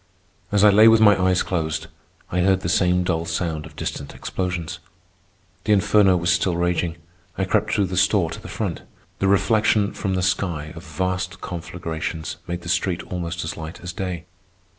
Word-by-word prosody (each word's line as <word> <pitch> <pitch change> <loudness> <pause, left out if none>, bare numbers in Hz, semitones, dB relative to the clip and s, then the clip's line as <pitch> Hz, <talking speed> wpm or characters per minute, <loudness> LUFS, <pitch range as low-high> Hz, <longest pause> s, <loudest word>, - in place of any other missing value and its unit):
As 105 0 +3
I 105 - +8
lay 110 +3 +7
with 115 0 +7
my 105 -2 +7
eyes 90 -1 +3
closed, 80 -3 -2 0.5
I 90 - 0
heard 95 +1 +3
the 85 - -2
same 90 0 +3
dull 85 -2 -1
sound 80 -2 -2
of - - -16
distant 70 - -5
explosions. 90 -2 -3 0.9
The 105 - +4
inferno 100 -1 +4
was 85 +1 +1
still 90 0 +1
raging. 85 -1 0 0.4
I - - 0
crept - - +1
through 100 - +2
the 95 - -4
store 95 -3 +3
to - - -7
the - - -10
front. - - -3 0.4
The 95 - +1
reflection 100 +1 +3
from 95 -2 -2
the 90 - 0
sky 85 -5 -1
of 80 - -9
vast 95 0 -3
conflagrations 80 -2 -5
made 85 0 -4
the - - -9
street 85 +1 0
almost 85 -1 -3
as 75 - -4
light 80 +1 -7
as 90 0 -6
day. 90 -2 -4
90 Hz, 185 wpm, -23 LUFS, 85-95 Hz, 0.9 s, I